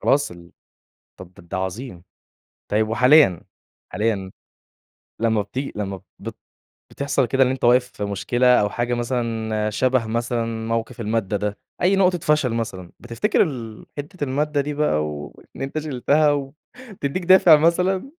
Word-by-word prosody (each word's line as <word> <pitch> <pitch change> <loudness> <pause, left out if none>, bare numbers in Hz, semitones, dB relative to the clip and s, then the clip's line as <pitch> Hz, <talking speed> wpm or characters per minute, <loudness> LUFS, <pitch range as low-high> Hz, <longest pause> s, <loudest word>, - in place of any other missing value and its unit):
خلاص، 140 -7 +2
طب 85 0 -14 0.7
طَب 90 0 -13
ده - - -15
أنت 85 - -10
عظيم! 95 0 -5 0.6
طيب 110 +1 +1
وحاليًا، 125 - +5 0.5
حاليًا 105 -4 -2 0.9
لما 110 -2 +2
بتيجي 130 +7 -5
لما 100 -2 -4 0.2
بت - - -8 0.5
بتِحصل 140 -1 0
كده 135 +2 +3
إن 125 - +1
أنت 130 -1 -4
واقف 125 +1 +4
في 105 - -5
مشكلة 120 +5 +2
أو 105 - +1
حاجة 120 +3 -2
مثلًا 115 -3 -2
شبه 125 +2 +1
مثلًا، 115 -1 -2
موقِف 115 +1 -3
المادة 105 -2 -1
ده، 105 0 -3 0.2
أي 190 +3 +4
نقطة 185 -2 +3
فشل 150 -6 +1
مثلًا 110 -6 -4
بتفتكر 120 - 0
ال 115 - -6
حِتّة 145 +3 -6
المادة 145 +2 0
دي 150 +1 -4
بقى 75 - +1
وإن 75 - -9
أنت 135 +3 -3
شِلتَها 150 +1 +2
و 140 -1 -3 0.5
بتدّيك 145 +6 -2
دافِع 180 -3 +7
مثلًا؟ 180 - +1
120 Hz, 150 wpm, -22 LUFS, 105-145 Hz, 0.9 s, دافِع